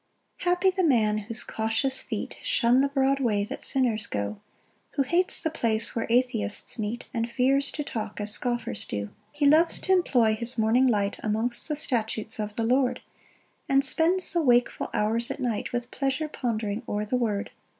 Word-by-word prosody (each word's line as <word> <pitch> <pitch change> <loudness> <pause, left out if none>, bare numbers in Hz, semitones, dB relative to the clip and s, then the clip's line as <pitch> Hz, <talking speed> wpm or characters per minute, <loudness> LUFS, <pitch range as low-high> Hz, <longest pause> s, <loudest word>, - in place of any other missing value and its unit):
1 355 - +1
Happy 375 +1 +2
the 375 0 -1
man 220 -8 +2
whose 215 +2 -2
cautious 225 +5 -1
feet - - -5
Shun 255 - +3
the 280 - +2
broad 275 0 +1
way 215 -6 +1
that 205 - -7
sinners 240 -5 0
go, 100 0 -4 0.5
Who 275 - +2
hates 345 +7 +3
the 320 - -1
place 225 -7 0
where 230 - -2
atheists 240 -2 0
meet, 215 +3 -4
And 230 -1 -2
fears 270 +3 +2
to 295 - -4
talk 220 -6 -5
as 210 0 +3
scoffers 240 -1 +1
do. 100 0 -4
2 - - -27 0.2
He 295 0 -1
loves 315 +4 +4
t' 380 - +1
employ 245 -12 +3
his 235 +3 0
morning 230 +4 +3
light 205 -4 0
Amongst 225 +3 0
the 305 - -2
statutes 225 -6 -2
of 210 0 -4
the 230 - -1
Lord: 255 +2 +1 0.7
And 275 +1 +3
spends 340 +7 +2
the 340 - +2
wakeful 245 -4 +2
hours 225 +3 0
at - - -5
night, 240 -5 -2
With 240 0 -4
pleasure 275 +3 -2
pondering 225 -6 -3
o'er 210 0 -2
the 215 - -2
word. 215 -5 -1
240 Hz, 185 wpm, -26 LUFS, 220-275 Hz, 0.7 s, loves